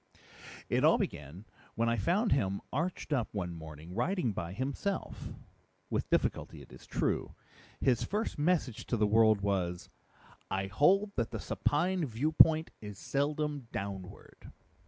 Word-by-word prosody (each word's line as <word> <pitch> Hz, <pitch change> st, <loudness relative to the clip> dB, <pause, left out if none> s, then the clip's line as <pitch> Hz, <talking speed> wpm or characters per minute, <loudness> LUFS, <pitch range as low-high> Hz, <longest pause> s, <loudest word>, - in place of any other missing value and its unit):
"It -, -, +1 dB
all -, -, +6 dB
began 75 Hz, +8 st, -5 dB, 0.3 s
when 115 Hz, +1 st, +1 dB
I 115 Hz, -, +2 dB
found 185 Hz, -, +1 dB
him 100 Hz, -7 st, +1 dB
arched 160 Hz, +2 st, -2 dB
up 125 Hz, -5 st, 0 dB
one 90 Hz, -4 st, -2 dB
morning, 80 Hz, +1 st, -9 dB
writing 140 Hz, -, 0 dB
by 85 Hz, -3 st, -4 dB
himself 140 Hz, -, -3 dB, 0.6 s
with -, -, -1 dB
difficulty, -, -, 0 dB
it -, -, -18 dB
is -, -, -13 dB
true. -, -, -1 dB, 0.4 s
His 125 Hz, -4 st, +2 dB
first 210 Hz, -5 st, -2 dB
message 150 Hz, -7 st, 0 dB
to 120 Hz, -, 0 dB
the 105 Hz, -, +3 dB
world 110 Hz, -1 st, +5 dB
was, 90 Hz, -3 st, -1 dB, 0.6 s
'_I 95 Hz, 0 st, -2 dB
hold 195 Hz, -, +4 dB
that 115 Hz, -3 st, 0 dB
the -, -, -5 dB
supine 175 Hz, +4 st, 0 dB
viewpoint 155 Hz, +5 st, +4 dB
is 105 Hz, -2 st, -8 dB
seldom 145 Hz, 0 st, -1 dB
downward! 100 Hz, -1 st, -7 dB
115 Hz, 140 wpm, -32 LUFS, 100-155 Hz, 0.6 s, all